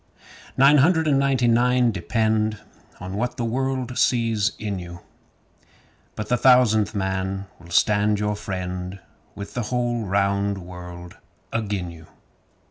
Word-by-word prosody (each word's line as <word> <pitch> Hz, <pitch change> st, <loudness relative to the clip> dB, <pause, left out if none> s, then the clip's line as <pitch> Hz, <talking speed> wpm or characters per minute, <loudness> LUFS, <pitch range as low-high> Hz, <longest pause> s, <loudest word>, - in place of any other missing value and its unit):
Nine 140 Hz, +3 st, +6 dB
hundred 160 Hz, +2 st, +3 dB
and 140 Hz, -2 st, +3 dB
ninety 135 Hz, -3 st, +2 dB
nine 120 Hz, +1 st, +3 dB
depend 110 Hz, +2 st, 0 dB, 0.4 s
on 90 Hz, +1 st, -7 dB
what 120 Hz, +3 st, -2 dB
the 120 Hz, -, -1 dB
world 130 Hz, +1 st, -2 dB
sees 115 Hz, -3 st, +2 dB
in 105 Hz, -3 st, -4 dB
you, 85 Hz, -1 st, -9 dB, 1.1 s
But 105 Hz, -, -5 dB
the 125 Hz, -, +1 dB
Thousandth 110 Hz, -4 st, +4 dB
Man 95 Hz, 0 st, -2 dB
will 85 Hz, 0 st, -15 dB
stand 105 Hz, +3 st, +2 dB
your 105 Hz, 0 st, -1 dB
friend 90 Hz, -1 st, -5 dB, 0.4 s
With 100 Hz, -, -8 dB
the 125 Hz, -, -2 dB
whole 120 Hz, -2 st, -1 dB
round 100 Hz, +1 st, +1 dB
world 90 Hz, -1 st, -10 dB, 0.4 s
agin 100 Hz, -6 st, -2 dB
you. 80 Hz, -1 st, -14 dB
105 Hz, 130 wpm, -23 LUFS, 95-120 Hz, 1.1 s, Nine